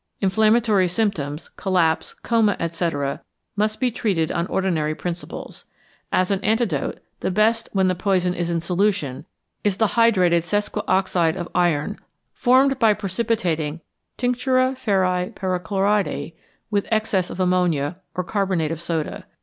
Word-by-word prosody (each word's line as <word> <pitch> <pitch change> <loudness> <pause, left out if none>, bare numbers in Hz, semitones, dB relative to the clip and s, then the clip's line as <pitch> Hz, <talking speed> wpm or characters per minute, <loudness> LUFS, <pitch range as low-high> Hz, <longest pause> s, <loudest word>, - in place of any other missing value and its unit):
Inflammatory 215 0 +3
symptoms, 170 -7 -2
collapse, 180 -4 +1
coma, 225 -3 +2
etc., 165 -4 -2 0.3
must 215 +1 0
be 255 -2 +1
treated 190 -9 0
on 170 +1 -1
ordinary 160 -6 0
principles. 175 +1 -6 0.5
As 185 +1 +2
an 195 0 -1
antidote, 215 - 0 0.2
the - - -1
best 220 +4 +2
when 190 -2 +3
the 185 - +2
poison 180 -1 +1
is 175 -1 -2
in 170 -1 0
solution 180 -5 -1 0.4
is 205 -2 +1
the 220 -1 +2
hydrated 185 -8 +4
sesquioxide 190 -3 0
of 175 -2 -5
iron, 175 +2 +1 0.3
formed 265 +1 +3
by 220 -2 +4
precipitating 185 -7 -1 0.4
tinctura 255 +1 +1
ferri 185 -6 +1
perchloridi 190 0 -1 0.4
with 200 -1 0
excess 215 -4 +1
of - - -7
ammonia, 180 -4 +1 0.2
or 180 - -1
carbonate 185 -5 0
of 165 0 -4
soda. 165 -2 -3
185 Hz, 130 wpm, -22 LUFS, 170-215 Hz, 0.5 s, hydrated